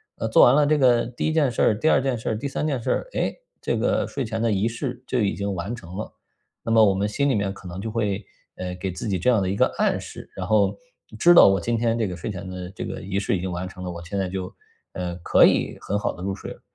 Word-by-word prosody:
呃， 110 - -3
做 - - +6
完 125 - +6
了 150 0 +4
这 155 +1 +3
个 120 -3 +4
第 120 +4 -3
1 155 - 0
件 145 -5 +2
事 115 - -2
儿， 105 - +3
第 155 - +3
2 - - +4
件 130 -2 -1
事 110 - -4
儿， 110 - -1
第 140 - -3
3 140 - -3
件 140 -5 -1
事 - - -3
儿， - - -1
诶， - - -1 0.3
这 - - -1
个 - - +1
睡 135 - -3
前 110 0 -3
的 115 -1 +2
仪 100 +2 +1
式 120 +2 -5
就 130 - -1
已 100 -3 +1
经 100 0 -2
完 95 +6 -4
成 95 -5 -11
了。 110 - -5 0.5
那 115 - -2
么 110 -1 +6
我 100 -2 +4
们 100 +2 0
心 140 +7 0
里 130 - +2
面 100 -1 -1
可 95 - -12
能 90 +1 -7
就 110 +3 -4
会， 105 -3 -1 0.3
呃， 90 0 -5
给 95 +1 -4
自 90 - -6
己 95 -3 0
这 90 - +2
样 120 -4 +4
的 95 - -1
一 95 - -1
个 - - +4
暗 - - +2
示， - - -10
然 - - -4
后 110 -2 +3 0.4
知 175 0 +6
道 170 - +9
我 95 0 +3
今 120 - -1
天 115 0 +1
这 110 - 0
个 90 - -5
睡 85 +6 -5
前 95 -1 -7
的 90 -1 -6
这 - - -6
个 - - -6
仪 95 +2 -2
式 100 - 0
已 - - -5
经 95 0 -3
完 90 +1 -4
成 90 -1 -10
了， 90 - -4
我 85 0 -8
现 100 +4 -4
在 95 -1 -1
就， 95 0 -5 0.4
呃， 90 -1 -4
可 - - +5
以 - - +2
很 100 - -1
好 - - -1
地 90 - -11
入 95 0 -2
睡 - - -8
了。 - - -12
105 Hz, 315 characters per minute, -24 LUFS, 95-120 Hz, 0.5 s, 道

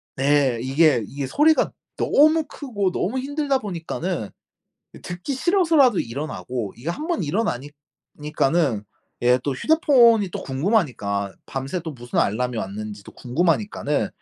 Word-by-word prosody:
네 135 -3 +2
이게 135 -1 +3
이게 140 -1 -5
소리가 305 - +3 0.3
너무 310 +2 +4
크고 205 -10 -2
너무 230 +9 -1
힘들다 280 0 -1
보니까는 175 - -4 0.7
이 - - -12
듣기 180 +10 -5
싫어서라도 320 - +3
일어나고 115 - -4
이게 125 +7 -7
한번 310 - -2
일어나니 145 - -2 0.5
니까는 150 -6 0 0.4
예 125 +1 +4
또 140 - 0
휴대폰이 235 - +4
또 - - -5
궁금하니까 130 - -1
밤새 135 +7 -4
또 160 -2 -6
무슨 120 -2 -5
알람이 125 +3 0
왔는지도 105 0 -6
궁금하니까는 165 - 0
155 Hz, 310 characters per minute, -23 LUFS, -, 0.7 s, 너무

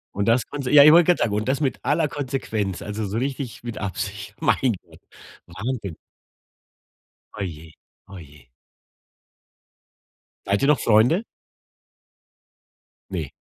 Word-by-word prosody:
Und 100 - 0
das 115 +1 +3
konse 140 -3 -4
ja, 145 -1 +9
ich 150 - +9
wollt 170 +1 +7
grad 180 - +4
sagen, 105 - 0
und 105 +2 -1
das 135 +2 +1
mit 135 -4 -1
aller 155 +1 +1
Konsequenz, 125 - -3
also 105 +1 -4
so 100 +3 -3
richtig 130 -3 -4
mit 120 -2 -6
Absicht. 100 +1 -5
Mein 135 -6 +2
Gott. - - -19 0.5
Wahnsinn. 100 0 -5 1.4
Oh 105 - -7
je. 80 -3 -8 0.4
Oh 100 -2 -10
je. 75 -5 -16 2.0
Seid - - 0
ihr 140 - +2
noch 150 -5 +4
Freunde? 120 - +3 1.9
Ne. - - -3
115 Hz, 135 wpm, -23 LUFS, 100-140 Hz, 2.0 s, ja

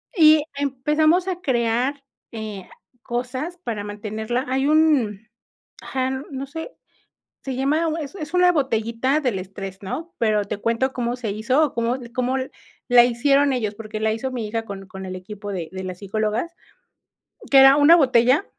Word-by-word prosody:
y 310 -3 +6
empezamos 300 +6 +1
a 365 -1 -3
crear, 255 0 0 0.3
eh, 215 -4 -7 0.3
cosas 255 +9 -4
para 230 - -5
mantenerla, 215 +4 -3
hay 265 +2 0
un, 275 -10 +2 0.5
ajá, 260 -1 -2 0.2
no 270 +1 -5
sé, 320 - -7 0.7
se 265 -2 -4
llama, 300 +5 +1
es 290 +4 -7
es 310 -3 -7
una 360 0 +5
botellita 260 -2 0
del 245 -9 -1
estrés, 195 +1 -8
¿no?, 325 - -5
pero 215 -3 +2
te 200 - -4
cuento 230 +5 0
cómo 240 -1 -2
se 225 -4 -3
hizo 240 +8 +1
o 290 - -6
cómo 235 +2 0 0.2
cómo 255 +1 0 0.5
la 245 -1 +7
hicieron 275 +3 +2
ellos, 215 -5 -1
porque 215 0 -7
la 220 0 +2
hizo 260 +4 -4
mi 235 -4 -4
hija 225 +1 -3
con 195 -2 -8
con 190 0 -8
el 185 - -6
equipo 205 +2 -8
de 175 -5 -4
de 190 0 -6
las 185 -1 -6
psicólogas, 215 - -2 1.0
que 275 - +8
era 270 +1 +8
una 295 +3 +7
botella 260 - +4
245 Hz, 165 wpm, -22 LUFS, 215-285 Hz, 1.0 s, que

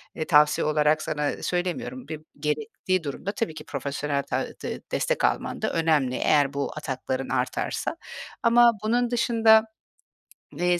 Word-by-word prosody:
eee, 160 - -3
tavsiye 150 -2 +4
olarak 150 0 +2
sana 150 -2 -2
söylemiyorum. 185 +8 -3
Bi 155 - -5 0.2
gerektiği 185 +2 -1
durumda 150 +7 -4
tabii 210 -4 -3
ki 150 - -8
profesyonel 140 0 -3
ta - - -2
de - - -5
destek - - 0
alman - - -1
da - - -1
önemli 155 -6 +2
eğer 145 -1 +2
bu 140 0 -2
atakların 130 -2 -3
artarsa - - -2 0.5
ama 235 +1 +6
bunun 240 +2 +1
dışında, 225 -2 +5 0.9
eee 175 0 +2
155 Hz, 140 wpm, -25 LUFS, 145-220 Hz, 0.9 s, ama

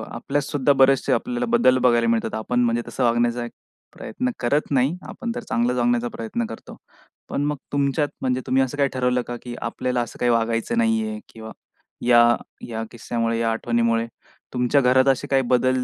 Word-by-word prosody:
आपल्यात 140 +4 -2
सुद्धा 145 0 +1
बरेचसे 135 0 +3
आपल्याला 245 0 -1
बदल 130 - +4
बघायला 120 -2 +3
मिळतात. 115 -1 0
आपण 110 +3 -1
म्हणजे 120 0 +1
तसं 130 - -3
वागण्याचा 120 0 +1
एक 120 - -9 0.5
प्रयत्न 255 0 -3
करत 145 +6 0
नाही. 135 +4 +2
आपण 235 -2 -5
तर - - -5
चांगलाच 120 +1 +1
वागण्याचा 120 0 +1
प्रयत्न 115 +1 -3
करतो. 110 0 -10 0.5
पण - - -2
मग 150 0 -1 0.2
तुमच्यात 140 +1 +1
म्हणजे 130 0 0
तुम्ही 130 +1 +3
असं 130 +2 -4
काही 140 -1 +2
ठरवलं 125 -1 +1
का? 120 - -4
की 120 -1 -7
आपल्याला 125 +1 -2
असं 120 - -7
काही 125 - +2
वागायचं 115 - 0
नाही 225 -1 +2
आहे 215 0 -5
किंवा 110 0 -9 0.5
या 120 -1 +6 0.4
या 115 -1 -4
किस्स्यामुळे 115 -1 -2
या 115 -1 +1
आठवणीमुळे 115 0 0 0.5
तुमच्या 125 +3 +2
घरात 130 +1 +4
असे 135 +1 +2
काही 135 -1 +2
बदल 130 +1 +2
125 Hz, 180 wpm, -23 LUFS, 115-135 Hz, 0.5 s, या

